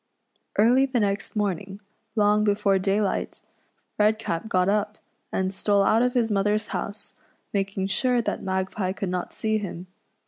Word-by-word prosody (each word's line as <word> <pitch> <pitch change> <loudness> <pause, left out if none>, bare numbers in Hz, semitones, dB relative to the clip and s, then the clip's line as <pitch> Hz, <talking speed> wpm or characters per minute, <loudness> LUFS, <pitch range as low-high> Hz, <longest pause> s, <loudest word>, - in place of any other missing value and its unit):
Early 250 +6 +5
the 255 -2 0
next 200 0 -1
morning, 200 -1 -2 0.4
long 210 0 +3
before 200 -2 +2
daylight, 195 +1 -1 0.6
Red 215 +1 +4
cap 215 -1 -3
got 185 -3 +2
up, 205 +1 0 0.3
and 190 0 -1
stole 200 0 +2
out 220 +3 +4
of 250 +1 +1
his 230 -3 +2
mother's 210 +1 +1
house, 205 0 -5 0.4
making 195 -1 -1
sure 245 +6 +1
that 230 - -2
Magpie 190 0 -2
could 195 -1 -3
not 180 0 -3
see 220 0 -1
him. 185 -3 -6
205 Hz, 150 wpm, -25 LUFS, 195-215 Hz, 0.6 s, Early